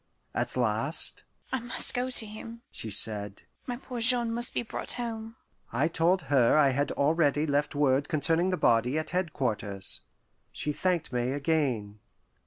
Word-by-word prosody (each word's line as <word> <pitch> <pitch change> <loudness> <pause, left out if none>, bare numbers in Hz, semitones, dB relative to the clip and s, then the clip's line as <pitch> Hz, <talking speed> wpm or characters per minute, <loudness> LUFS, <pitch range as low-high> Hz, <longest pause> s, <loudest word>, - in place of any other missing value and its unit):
At - - -2
last, 120 +5 +1 0.3
"I 260 - 0
must 240 0 0
go 250 +1 -1
to 245 -3 +1
him," 225 +2 -10
she 110 - -4
said. 105 -1 +4 0.2
"My 245 -1 -3
poor 250 -1 -7
Jean 235 0 +3
must 240 +1 0
be - - 0
brought 225 - -3
home." 225 -2 -6 0.4
I 150 - +1
told 170 +3 +1
her 135 -1 +3
I 145 -2 +5
had 145 +2 -1
already 150 0 +1
left 145 0 -1
word 140 -1 +1
concerning 165 +3 +2
the 185 - -1
body 120 +3 +2
at 155 0 -3
headquarters. 125 - -2 0.5
She 150 +2 -3
thanked 180 -4 -1
me 120 0 0
again. 135 -9 -1
155 Hz, 160 wpm, -28 LUFS, -, 0.5 s, I